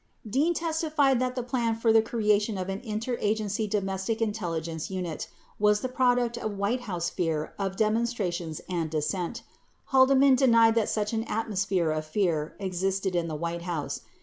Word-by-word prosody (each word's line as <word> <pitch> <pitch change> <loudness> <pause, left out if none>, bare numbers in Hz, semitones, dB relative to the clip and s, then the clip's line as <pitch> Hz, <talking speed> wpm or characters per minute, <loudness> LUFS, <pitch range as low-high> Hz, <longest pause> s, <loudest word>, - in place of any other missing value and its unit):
] - - -43
36 215 - -10
Dean 310 +6 +3
testified 315 -5 +1
that 255 0 -1
the 250 - -2
plan 240 -2 0
for 225 0 +2
the 225 - +7
creation 210 -2 +1
of 185 0 -3
an 195 +1 -3
Inter 230 +1 -3
Agency 215 0 0
Domestic 195 +1 -1
Intelligence 170 -7 -2
Unit 180 -4 -4 0.3
was 210 0 +3
the 255 - -2
product 245 -2 +1
of 215 -3 -4
White 205 +6 0
House 175 -2 -2
fear 160 -3 -2
of 195 -1 -2
demonstrations 215 -7 -1
and 170 -3 -2
dissent. 165 +3 -2
37 - - -32 0.4
Haldeman 270 +1 +6
denied 230 -4 +5
that 225 -2 +1
such 210 0 -1
an 225 0 0
atmos 210 -4 -2
phere 180 -5 +1
of 155 0 -1
fear 160 -4 0
existed 190 0 -1
in 170 -1 0
the 155 - -4
White 170 +2 -3
House. 170 -4 -3
210 Hz, 180 wpm, -27 LUFS, 180-235 Hz, 0.4 s, the